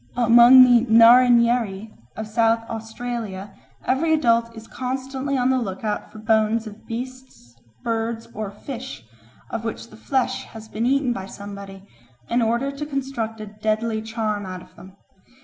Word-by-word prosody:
Among 240 +2 +8
the 245 -1 +4
Narrinyeri 235 -3 +5 0.2
of 220 - -5
South 225 +1 +1
Australia 225 -3 -6 0.3
every 315 +5 +1
adult 230 -5 +1
is 225 - -10
constantly 265 +2 -3
on 255 +1 +2
the 260 - +2
look 195 -5 -5
out 210 -1 -3
for - - -12
bones 220 +1 +1
of 215 0 -12
beasts, 255 - -8 0.3
birds, 225 0 -2
or 215 -1 -4
fish, 245 - -8 0.5
of 225 - -4
which 230 +1 -6
the 215 - -13
flesh 260 +2 -1
has 220 -1 -12
been 220 +2 -2
eaten 270 -2 +1
by 190 -4 -6
somebody, 200 -1 -10 0.5
in 240 +1 +2
order 235 +5 0
to 280 +1 -7
construct 265 -6 -4
a - - -5 0.2
deadly 220 +1 0
charm 220 -2 -3
out 185 -1 -7
of - - -21
them. 190 +1 -15
230 Hz, 155 wpm, -22 LUFS, 215-250 Hz, 0.5 s, Among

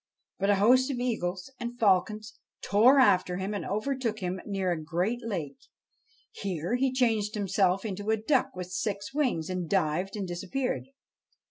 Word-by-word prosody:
But 195 +1 +1
a 205 - +5
host 250 +7 +4
of 270 - -2
eagles 220 -4 -2
and 240 0 -5
falcons 215 +1 +1 0.3
tore 235 +7 +5
after 185 -7 +4
him 190 +2 -3
and 205 - -3
over 215 +8 -1
took 235 -4 -2
him 185 -2 -3
near 195 -3 -1
a 160 -2 -2
great 180 +9 -1
lake. 170 -11 -4 0.7
Here 180 0 -3
he 260 +1 +1
changed 225 -4 +1
himself 195 -1 +1
into 205 0 -4
a 220 - +3
duck 250 +2 +1
with 180 0 -6
six 200 +2 -3
wings, 250 - 0
and 180 -3 -3
dived 185 +1 0
and 200 -3 -3
disappeared. 250 +9 -3
205 Hz, 165 wpm, -28 LUFS, 185-235 Hz, 0.7 s, a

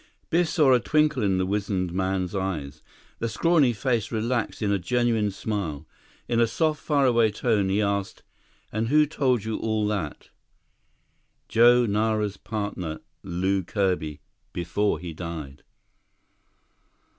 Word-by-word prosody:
Biff 170 0 +2
saw 150 -8 +4
a 125 - +5
twinkle 150 0 +2
in 95 -3 +2
the 95 - +1
wizened 95 -3 -1
man's 95 -1 -1
eyes. 80 -7 -3 0.4
The 115 - -1
scrawny 150 +2 +3
face 115 -2 -1
relaxed 115 0 -1
in 100 - +1
a 100 - +1
genuine 115 +2 +1
smile. 95 -7 -4 0.4
In 115 - +1
a 115 - +4
soft, 155 +6 0
faraway 125 -7 +3
tone, 105 -2 0
he 100 +2 +2
asked, 100 -1 -2 0.5
"And 110 +1 -1
who 150 +4 +5
told 130 -6 0
you 110 0 -2
all 110 -1 0
that?" 95 -9 -4 1.2
"Joe 120 +2 +5
Nara's 105 -1 0
partner, 100 -7 -4 0.2
Lew 95 +1 0
Kirby, 90 -7 -1 0.3
before 90 +3 0
he 85 0 -7
died." 80 -4 -7
105 Hz, 135 wpm, -25 LUFS, 95-120 Hz, 1.2 s, a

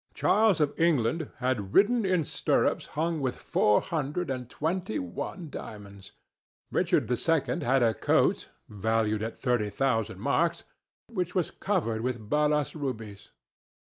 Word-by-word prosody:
Charles 215 -5 +3
of 150 -2 +2
England 155 -2 +2
had 120 -7 -2
ridden 220 +1 +4
in 180 -4 +2
stirrups - - 0
hung 165 +1 0
with 130 -2 -1
four 105 - +2
hundred 160 -1 -2
and 125 -2 -4
twenty 160 - -2
one 95 - -5
diamonds. 100 -2 -9 0.6
Richard - - +1
II 160 +6 +1
had 130 0 +3
a 115 -1 +3
coat, - - +1 0.2
valued 110 +1 0
at 115 +1 -4
thirty 120 -5 0
thousand 115 -3 -1
marks, 165 +8 +1 0.4
which 180 -6 -3
was 180 -3 0
covered 135 - -1
with 120 -3 -4
balas 150 0 +2
rubies. 115 -9 -5
135 Hz, 135 wpm, -28 LUFS, 110-165 Hz, 0.6 s, ridden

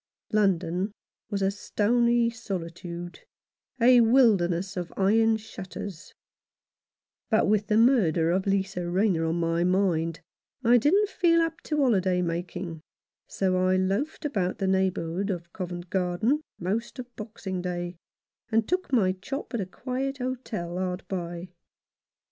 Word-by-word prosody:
London 190 -1 +1 0.4
was 200 -2 -1
a 195 - +2
stony 235 +3 +2
solitude, 175 -5 -6 0.6
a 245 +1 +7
wilderness 200 -6 +3
of 175 -2 -4
iron 220 +3 +4
shutters; 195 -3 -8 1.1
but 220 - +3
with 210 0 +2
the 215 -1 +2
murder 190 - +4
of 190 +2 0
Lisa 190 -3 0
Rayner 180 -3 +2
on 165 +1 0
my 170 0 +1
mind 175 -3 +1 0.4
I 240 +1 +6
didn't 390 - +3
feel 340 -3 +3
up 330 -1 -1
to 305 - -1
holiday 190 -10 +2
making, 170 -1 -4 0.5
so 185 -1 0
I 185 0 +3
loafed 195 +13 -1
about 195 -10 -1
the 195 - -1
neighbourhood 190 0 0
of 170 -3 -4
Covent 175 -1 -6
Garden 190 - +1 0.2
most 210 +7 -3
of 245 -1 -9
Boxing 210 -4 -5
Day, 175 0 -4 0.6
and 220 0 +2
took 365 -4 -1
my 210 -8 +3
chop 225 +10 -6
at 235 - 0
a 185 - -4
quiet 260 +6 -3
hotel 235 -9 -4
hard 185 0 -3
by. 175 -1 -5
195 Hz, 135 wpm, -27 LUFS, 175-230 Hz, 1.1 s, a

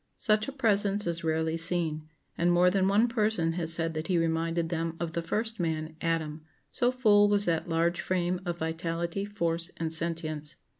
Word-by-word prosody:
Such 215 -1 +2
a - - -4
presence 205 -6 +1
is 170 -1 -2
rarely 160 0 0
seen; 160 -2 0 0.3
and 175 +1 +2
more 180 +1 +4
than 190 0 +2
one 205 +4 +3
person 215 -8 0
has 165 -1 0
said 165 0 +1
that 155 0 -4
he 180 - +1
reminded 165 0 0
them 165 -1 -3
of 170 -2 -3
the 170 - -2
first 220 +6 -3
man, 160 -2 -2
Adam, 160 -2 -2 0.3
so 245 0 +1
full 210 -5 +4
was 205 0 +5
that 170 0 -1
large 170 +1 +1
frame 180 0 -1
of 175 -2 -3
vitality, 165 +3 -3
force, 170 -4 -1
and 165 -1 -2
sentience. 160 -2 -2
170 Hz, 185 wpm, -28 LUFS, 165-195 Hz, 0.3 s, was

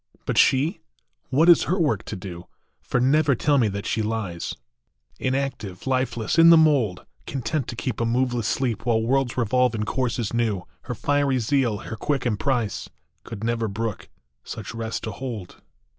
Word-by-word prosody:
But - - -1
she? 145 +8 +3 0.5
What 145 +6 +3
is 175 - +7
her 185 - 0
work 140 - +1
to - - -5
do? 90 -2 -8 0.3
For - - -1
never 140 +2 +3
tell 145 +4 +2
me 115 - +3
that 100 0 -4
she 110 - 0
lies 105 -6 -3 0.6
Inactive, 130 -8 -3
lifeless, 130 0 0
in 165 0 +9
the 165 - +9
mould, 130 - +3 0.2
Content 135 +2 -2
to 120 - -5
keep 120 +1 -3
a - - +2
moveless 120 -1 0
sleep 125 -4 -1
While 115 -2 +1
worlds 130 +1 +1
revolve 125 +1 +2
in 105 - -1
courses 120 -2 -1
new. 110 -6 0 0.2
Her 125 - -4
fiery 140 +1 +1
zeal, 120 -2 +1
her 110 - -6
quick 135 +4 -1
emprise, 115 -1 -1 0.3
Could 110 -2 -8
never 115 -1 0
brook 110 +1 -4 0.3
such 110 -1 -7
rest 115 -1 -4
to 110 - -3
hold 110 -5 -7
120 Hz, 170 wpm, -24 LUFS, 110-135 Hz, 0.6 s, in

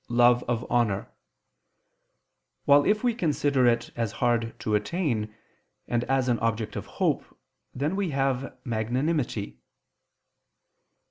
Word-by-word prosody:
love 120 0 +5
of 120 0 -1
honor: 110 -5 0 1.5
while 145 0 +6
if 210 +2 +2
we 245 -1 +2
consider 145 - +1
it 120 0 +1
as 115 -3 -2
hard 115 -1 0
to 110 - -2
attain, 110 - 0 0.6
and 120 0 0
as 135 -1 +1
an 120 -2 +1
object 110 -2 -1
of - - -5
hope, - - +1 0.5
then 150 +7 -1
we 195 -3 -1
have 135 -2 -1
_magnanimity. 120 0 -1
120 Hz, 120 wpm, -27 LUFS, 115-145 Hz, 1.5 s, while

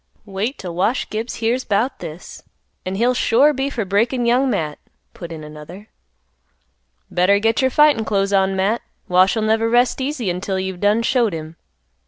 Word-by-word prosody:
"Wait 205 +6 -3
'till 180 -2 -7
Wash 190 +9 0
Gibbs 220 +3 -4
hears 235 +3 -1
'bout 215 +6 -1
this, 165 0 -9 0.5
an' 185 - -2
he'll 240 +5 +2
sure 260 +5 +3
be 270 0 -2
for 235 -6 -3
breakin' 235 +6 +1
Young 250 +3 +2
Matt," 150 -10 -2 0.3
put 170 -2 -9
in 160 -2 -7
another. 155 +7 -11 1.2
"Better 185 +3 +3
get 225 +3 +1
your 260 - +3
fightin' 295 -3 +4
clothes 200 -2 0
on, 195 0 +2
Matt; 200 +5 0 0.3
Wash'll 185 +5 +3
never 220 +1 +1
rest 245 +3 +2
easy 260 - -2
until 190 +2 -3
you've 190 -1 -4
done 210 +3 +2
showed 235 -5 +1
him." 160 0 -7
215 Hz, 170 wpm, -20 LUFS, 185-240 Hz, 1.2 s, fightin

